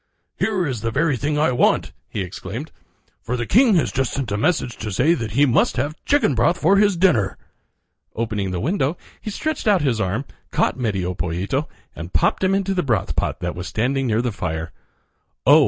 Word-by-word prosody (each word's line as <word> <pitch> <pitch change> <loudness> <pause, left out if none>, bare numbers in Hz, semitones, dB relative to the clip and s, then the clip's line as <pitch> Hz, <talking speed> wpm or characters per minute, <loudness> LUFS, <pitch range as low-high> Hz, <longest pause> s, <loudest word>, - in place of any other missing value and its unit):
"Here 190 -5 0
is 130 -7 -3
the 115 - -1
very 145 +4 +1
thing 150 +4 -1
I 150 -3 +3
want," 125 - +2 0.2
he 105 - -3
exclaimed, 100 - -6 0.5
"for 125 +2 -3
the 120 - -2
king 230 - +5
has 165 - +2
just 135 -2 -1
sent 130 -6 -3
a - - +1
message 120 +1 0
to 105 -1 -5
say 135 - +3
that 115 -10 -3
he 140 +4 +5
must 125 -3 +2
have 145 +2 0
chicken 285 - +3
broth 125 +9 +2
for 195 +6 +4
his 200 -3 +3
dinner." 120 - +2 0.8
Opening 105 -4 -2
the 90 -1 -2
window 155 - 0 0.2
he - - -5
stretched 310 +5 -3
out 195 -6 +4
his 120 -6 +1
arm, 110 +7 -1 0.2
caught - - +1
Medio 95 -8 -1
Pollito, 90 - -2 0.3
and 85 +2 -8
popped 80 - +2
him 190 +1 +3
into 195 0 0
the 180 - +1
broth 115 - 0
pot - - -1
that 85 0 -2
was 90 +1 -6
standing 130 +6 0
near 115 +1 +1
the 120 - 0
fire. 80 -5 -4 0.7
Oh! - - +8
125 Hz, 205 wpm, -21 LUFS, 105-165 Hz, 0.8 s, Oh